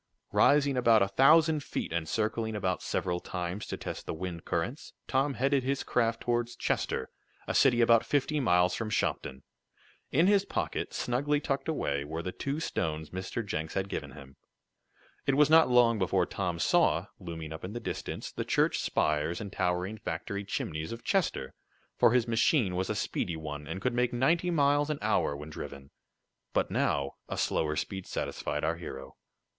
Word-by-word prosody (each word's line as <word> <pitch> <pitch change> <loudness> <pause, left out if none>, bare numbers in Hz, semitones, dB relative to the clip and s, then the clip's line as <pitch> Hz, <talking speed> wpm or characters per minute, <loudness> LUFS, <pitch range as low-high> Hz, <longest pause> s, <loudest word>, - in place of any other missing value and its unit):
Rising 140 -2 +4
about 115 -4 +5
a - - +1
thousand 150 +8 +5
feet, - - -4
and 80 -2 -2
circling 110 +1 -1
about 95 -4 -1
several 90 -1 -1
times 90 +2 -4
to - - -4
test - - -6
the - - -3
wind 85 -1 -6
currents, 115 - -3
Tom 135 +1 +1
headed 135 +2 +2
his 135 +2 -1
craft 115 -2 0
toward 120 -1 0
Chester, 65 - -1 0.4
a - - -1
city 120 -3 +4
about 115 -1 +5
fifty 145 +1 0
miles 90 -7 +3
from 110 +2 -3
Shopton. 65 -10 -2 0.7
In 160 +6 +4
his 200 0 +4
pocket, - - -3
snugly 145 +4 0
tucked 135 -2 -2
away, 70 - -1
were 80 +3 -5
the 90 - -3
two 140 +8 -3
stones 80 - -3
Mr. 95 +5 -4
Jenks 80 -5 -4
had 95 0 -1
given - - -5
him. 70 -2 -13 0.9
It 135 - +3
was 150 +1 +4
not 160 -3 +7
long 120 -3 +5
before 95 -1 +2
Tom 90 -3 -3
saw, 90 - +3
looming 80 -4 -6
up 80 - -9
in 95 +3 -5
the 120 - -4
distance 120 - -5
the - - -3
church - - +2
spires 75 +3 0
and 100 -2 -7
towering 90 +4 -1
factory 100 +5 -4
chimneys 80 -5 -3
of 115 0 -7
Chester, 175 - 0 0.5
for - - +6
his 125 -1 +2
machine 115 - +2
was 95 +1 -1
a - - 0
speedy 85 -2 -2
one, 75 -1 -6
and 80 +4 -4
could 125 +5 -1
make 125 0 +1
ninety 165 +9 +2
miles 145 -2 +3
an 150 - -1
hour 70 - +1
when 75 +2 -9
driven. 70 -2 -8 0.6
But - - +1
now 70 -1 0
a - - -3
slower 75 -1 0
speed 95 +4 -4
satisfied 75 0 -3
our 80 +1 0
hero. 65 -5 -8
105 Hz, 180 wpm, -30 LUFS, 85-135 Hz, 0.9 s, not